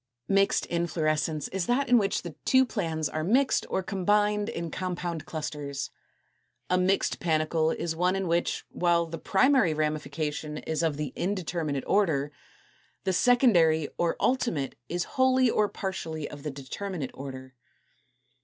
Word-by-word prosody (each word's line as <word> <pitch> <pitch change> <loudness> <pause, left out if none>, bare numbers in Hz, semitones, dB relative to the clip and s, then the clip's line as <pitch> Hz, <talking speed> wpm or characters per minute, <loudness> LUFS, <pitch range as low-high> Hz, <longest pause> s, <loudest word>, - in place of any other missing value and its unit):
227. 195 0 +5
=Mixed 200 - 0 0.3
Inflorescence= 155 -1 0
is 185 -2 -2
that 270 +3 +2
in 245 -1 +6
which 200 -1 0
the 170 -3 -6
two 260 0 +5
plans 165 - -2
are 155 +1 -3
mixed 255 - +2
or 190 - -1
combined 205 +3 +1
in 170 -7 -4
compound 175 -3 -4
clusters. 145 -3 -4 0.8
A 180 - +4
mixed 190 +2 +1
panicle 160 -1 +1
is 160 0 -2
one 180 +3 +2
in 195 -1 -1
which, 170 +1 0
while 170 -1 +2
the 165 0 -7
primary 230 - +3
ramification 150 0 -2
is 160 +1 -2
of 160 -3 0
the 150 -4 -4
indeterminate 170 -7 -2
order, 155 -8 +2 0.7
the 190 0 0
secondary 175 - +4
or 170 -1 +1
ultimate 205 - 0 0.2
is 175 0 -1
wholly 260 0 +3
or 210 -1 +2
partly 160 -5 -4
of 145 - -10
the 150 - -4
determinate 145 +3 -5
order. 130 -1 -8
170 Hz, 145 wpm, -28 LUFS, 155-195 Hz, 0.8 s, in